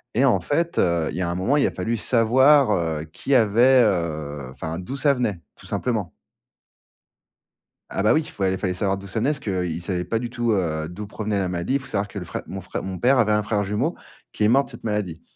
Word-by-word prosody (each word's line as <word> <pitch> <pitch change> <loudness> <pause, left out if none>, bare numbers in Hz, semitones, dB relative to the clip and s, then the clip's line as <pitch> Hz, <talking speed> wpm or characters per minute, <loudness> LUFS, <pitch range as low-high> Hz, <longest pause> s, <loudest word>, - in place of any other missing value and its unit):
et 130 +5 +4
en 115 -8 +4
fait, 165 - 0
heu, 85 -3 +2
il - - -6
y - - -1
a 85 - -1
un 85 - -2
moment, 125 +11 +1
il 140 - +3
a - - -2
fallu 115 +1 -2
savoir, 130 +4 +4
heu, 80 -4 0
qui 140 - 0
avait, 120 +3 +5
heu, 75 - -2
enfin, 80 +4 -5
d'où 130 +10 -6
ça 140 +1 +3
venait, 110 -8 -1 0.2
tout - - -15
simplement. 110 -8 -2 1.8
Ah 100 - -1
bah 105 - +5
oui, 160 - +3
fallait 95 -6 -1
fallait 95 -1 -1
savoir 95 +1 -1
d'où 100 0 -10
ça 105 - -3
venait, 125 +7 +1
parce 145 - -2
qu'ils 90 - -2
savaient 90 0 -2
pas 115 +6 -1
du 120 -1 -4
tout, 120 -2 0
heu, 80 -5 -1
d'où 100 +4 -7
provenait 105 -1 -2
la 95 - -1
maladie. 90 +10 -1
Faut 130 - -11
savoir 100 -4 -1
que 100 0 -7
le - - -6
frè 80 - -5
mon 95 - -6
frè 95 - -5
mon 95 -1 -5
père 130 +2 +4
avait 110 -3 +3
un 105 0 +2
frère 105 -1 -1
jumeau, 110 - -1 0.4
qui 105 - -1
est - - +5
mort 135 +4 +4
de - - -12
cette - - -12
maladie 100 -7 -2
105 Hz, 240 wpm, -23 LUFS, 90-120 Hz, 1.8 s, avait